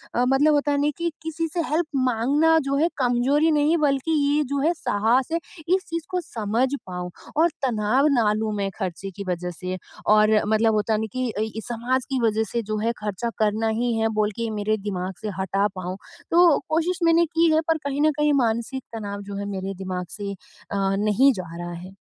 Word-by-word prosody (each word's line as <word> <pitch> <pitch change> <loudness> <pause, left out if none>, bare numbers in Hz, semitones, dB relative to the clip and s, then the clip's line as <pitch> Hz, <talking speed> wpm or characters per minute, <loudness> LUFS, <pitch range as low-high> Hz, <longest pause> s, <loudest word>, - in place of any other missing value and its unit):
अ, 245 - +3
मतलब 280 +4 +4
होता 290 0 +2
है 285 - +1
ना 295 - +2
कि 340 0 -1
किसी 320 +1 -2
से 345 - 0
हेल्प 315 +3 +1 0.2
माँगना 285 +8 +3
जो 275 - +1
है 325 +4 +3
कमजोरी 265 +5 +2
नहीं 300 +2 +3
बल्कि 295 +1 +1
ये 290 +1 +2
जो 280 0 0
है 315 +4 +3
साहस 240 -3 +1
है, 335 - +2 0.4
इस 380 - -2
चीज़ 335 -1 -3
को 365 - -1
समझ 225 -2 -1 0.2
पाऊँ, 180 -1 -5 0.3
और 330 +2 +5 0.2
तनाव 245 +4 +2
ना 225 -6 +3
लूँ 215 0 -1
मैं 200 -1 -1
खर्चे 190 -1 -4
की 200 - -5
वजह 180 0 -2
से 185 +2 -5 0.4
और 215 0 +5 0.2
मतलब 220 +1 +3
होता 215 +1 +1
है 215 - +1
ना - - -1
कि 255 -1 -1
अ, 210 - -3 0.3
समाज 245 +2 -1
की 265 -1 0
वजह 220 0 +2
से 235 - 0
जो 215 0 -3
है 225 +2 +1
खर्चा 210 +2 -3
करना 215 +1 +1
ही 245 -1 +1
है 225 - +2
बोल 210 0 +2
के 230 -1 -2
मेरे 215 +1 +1
दिमाग 190 -2 -4
से 215 - -3
हटा 195 +2 +1
पाऊँ। 185 0 -5 0.3
तो 345 -2 +6
कोशिश 335 +4 0
मैंने 335 0 +5
की 330 +1 +2
है 315 - +4
पर 325 -1 +2
कहीं 280 +1 -1
न 310 +1 +4
कहीं 300 0 +3
मानसिक 235 +3 -1
तनाव 205 -2 -5
जो - - -5
है 200 - -3
मेरे 190 +1 -4
दिमाग 185 -1 -4
से 200 -1 -4 0.4
अ, 200 - -1 0.2
नहीं 215 +7 +4
जा 175 -5 -7
रहा 175 0 -5
है। 180 +2 -9
235 Hz, 215 wpm, -24 LUFS, 205-295 Hz, 0.4 s, तो